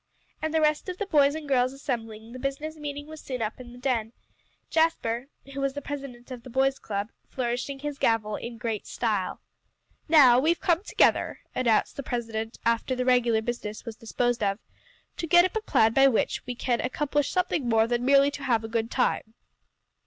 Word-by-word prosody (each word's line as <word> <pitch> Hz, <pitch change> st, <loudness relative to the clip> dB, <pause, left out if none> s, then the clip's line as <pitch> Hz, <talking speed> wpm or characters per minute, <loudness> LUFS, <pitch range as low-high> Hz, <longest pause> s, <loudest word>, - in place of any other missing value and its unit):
And 315 Hz, -, -1 dB
the 320 Hz, 0 st, +2 dB
rest 305 Hz, +4 st, +1 dB
of 365 Hz, -, -5 dB
the 415 Hz, -, -2 dB
boys 290 Hz, -5 st, +4 dB
and 315 Hz, -2 st, -6 dB
girls 255 Hz, -1 st, +2 dB
assembling, 225 Hz, -5 st, -5 dB
the 255 Hz, -, -7 dB
business 275 Hz, +4 st, -3 dB
meeting 290 Hz, -1 st, -6 dB
was 315 Hz, 0 st, -10 dB
soon 255 Hz, -, -4 dB
begun 220 Hz, -2 st, -2 dB
in 245 Hz, -1 st, -10 dB
the 245 Hz, -, -12 dB
"den," 240 Hz, -3 st, -1 dB, 0.6 s
Jasper 270 Hz, -7 st, +1 dB, 0.3 s
who 275 Hz, -, -4 dB
was 275 Hz, -1 st, 0 dB
the 285 Hz, -, -4 dB
president 270 Hz, -3 st, -7 dB
of 250 Hz, -2 st, -6 dB
the 255 Hz, -, -11 dB
boys' 270 Hz, +2 st, +1 dB
club, 205 Hz, +1 st, -4 dB, 0.2 s
flourishing 250 Hz, +2 st, -2 dB
his 290 Hz, 0 st, -5 dB
gavel 215 Hz, -2 st, +1 dB
in 235 Hz, +2 st, -7 dB
great 225 Hz, -3 st, -3 dB
style. 210 Hz, -6 st, -2 dB, 0.7 s
"Now 265 Hz, -6 st, +7 dB
we've 325 Hz, +5 st, +2 dB
come 340 Hz, 0 st, +2 dB
together," -, -, +2 dB
announced 235 Hz, -4 st, +1 dB
the -, -, -2 dB
president 225 Hz, -3 st, -4 dB
after 230 Hz, +3 st, +1 dB
the 250 Hz, 0 st, -1 dB
regular 240 Hz, -3 st, +3 dB
business 220 Hz, -3 st, -5 dB
was 230 Hz, -, -6 dB
disposed 240 Hz, +1 st, -1 dB
of, 200 Hz, -1 st, +1 dB, 0.6 s
"to 335 Hz, -, -3 dB
get 345 Hz, +2 st, +6 dB
up 370 Hz, -, -3 dB
a 440 Hz, -, 0 dB
plan 225 Hz, -, +3 dB
by 270 Hz, +2 st, +6 dB
which 245 Hz, -5 st, 0 dB
we 250 Hz, -, -3 dB
can 240 Hz, 0 st, 0 dB
accomplish 290 Hz, +3 st, 0 dB
something 355 Hz, -8 st, 0 dB
more 225 Hz, -1 st, +4 dB
than 240 Hz, +1 st, -1 dB
merely 275 Hz, +2 st, +5 dB
to 285 Hz, -1 st, -7 dB
have 235 Hz, -4 st, +1 dB
a -, -, -4 dB
good 225 Hz, 0 st, -1 dB
time." 230 Hz, -3 st, -1 dB
250 Hz, 195 wpm, -27 LUFS, 230-285 Hz, 0.7 s, Now